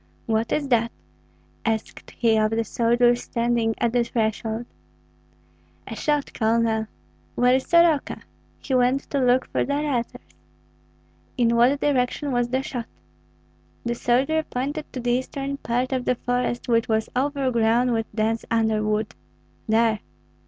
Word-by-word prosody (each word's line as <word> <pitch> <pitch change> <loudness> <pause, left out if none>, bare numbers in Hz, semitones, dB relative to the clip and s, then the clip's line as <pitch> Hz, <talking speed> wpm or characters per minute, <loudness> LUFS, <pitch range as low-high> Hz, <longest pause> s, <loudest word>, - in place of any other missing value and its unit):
"What 225 +1 0
is 290 -2 0
that?" 235 -2 +2 0.7
asked 220 -1 -3
he 230 -2 +3
of 215 0 +3
the 225 +1 0
soldier 240 +2 +3
standing 235 -2 -1
at 235 -1 0
the 245 -1 +3
threshold. 225 0 -2 1.2
"A - - -7
shot, 295 +3 -1
Colonel." 220 -1 +1 0.5
"Where 250 +1 +4
is 260 0 +1
Soroka?" 335 -4 +3 0.3
"He 270 - -5
went 255 +2 +3
to 280 - +1
look 250 0 +3
for - - +1
the 280 - -1
letters." 285 -5 -1 1.2
"In 235 -1 +3
what 250 +4 +4
direction 280 +1 0
was 245 -1 0
the 260 +2 0
shot?" 245 -4 -5 1.0
The 235 - 0
soldier 260 +7 +1
pointed 290 +2 -4
to 255 - -5
the 240 0 -1
eastern 275 +2 -2
part 250 0 -1
of 255 -1 -1
the 250 - +2
forest, 245 0 -2
which 230 -1 +2
was 220 0 +1
overgrown 250 -3 +1
with 225 -1 -1
dense 225 +1 0
underwood. 215 -2 0 0.6
"There!" 220 -1 +3
240 Hz, 140 wpm, -24 LUFS, 225-260 Hz, 1.2 s, Where